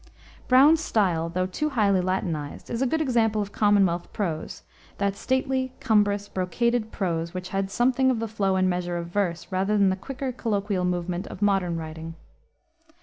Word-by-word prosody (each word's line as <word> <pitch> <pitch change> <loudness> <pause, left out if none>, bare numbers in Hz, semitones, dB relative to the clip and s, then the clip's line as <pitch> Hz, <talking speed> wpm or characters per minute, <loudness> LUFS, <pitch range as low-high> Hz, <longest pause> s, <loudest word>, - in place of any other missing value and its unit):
Browne's 285 +5 +6
style, 175 - +1
though 185 +2 -1
too 300 +12 -2
highly 205 -8 +2
Latinized, 175 -5 -3
is 235 - -2
a 265 - +3
good 320 +5 0
example 230 -6 +2
of 205 -1 -3
Commonwealth 200 -5 +2
prose, 165 -7 -4 0.3
that 200 -1 0
stately, 260 +2 -1
cumbrous, 205 -3 +2
brocaded 220 +5 -1
prose, 170 -3 -2
which 180 0 -5
had 195 0 -1
something 255 +5 +2
of 255 - +1
the 225 0 -2
flow 200 -3 0
and 185 0 +2
measure 180 -1 -1
of 170 0 -5
verse, 175 -3 -2
rather 195 +3 +1
than 195 -2 +4
the - - 0
quicker, 270 +6 -5
colloquial 205 -6 -1
movement 180 0 -2
of 200 - -6
modern 190 -4 +1
writing. 160 0 -7
200 Hz, 170 wpm, -25 LUFS, 180-230 Hz, 0.3 s, Browne's